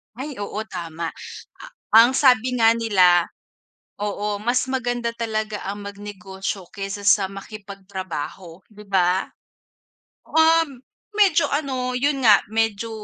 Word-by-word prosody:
Ay, 270 +3 -6
oo, 205 - -5
tama. 165 -2 -5 0.6
A - - -9 0.4
ang 245 - +3
sabi 255 -2 +3
nga 225 0 +6
nila 185 -7 +4 0.7
oo, 205 0 -2
mas 240 +3 +1
maganda 245 -2 -1
talaga 215 -2 -3
ang 205 +1 -5
magnegosyo 195 -2 -6
kaysa 200 0 -5
sa 200 -1 +5
makipagtrabaho, 190 -4 -8
'di 210 0 -14
ba? 185 -1 +2 1.0
Um, 320 -5 +3 0.3
medyo 375 -6 +4
ano, 260 -4 -2
yun 275 +1 0
nga, 210 -3 +7
medyo 225 0 0
210 Hz, 115 wpm, -22 LUFS, 195-250 Hz, 1.0 s, nga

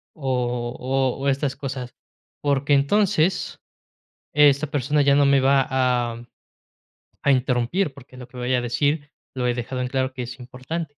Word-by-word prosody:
o 125 -3 -2
o 130 0 0
o 140 - -2
estas 135 0 -1
cosas, 130 -3 -6 0.5
porque 140 0 +1
entonces, 180 +4 +2 0.8
esta 145 0 +5
persona 145 +1 +1
ya 140 0 +4
no 145 0 +4
me 140 -1 +4
va 135 0 +3
a 125 -3 0 1.0
a 140 - +4
interrumpir, 130 +6 +1
porque 130 -2 -15
lo 125 -1 -10
que 125 - -14
voy 125 +1 -1
a 125 - +1
decir 145 +5 -1 0.2
lo 125 -1 -2
he 120 - +2
dejado 125 +1 -4
en 125 - -1
claro 130 0 -1
que 125 -1 -5
es 125 +2 -8
importante. 145 +5 -6
135 Hz, 165 wpm, -23 LUFS, 125-145 Hz, 1.0 s, esta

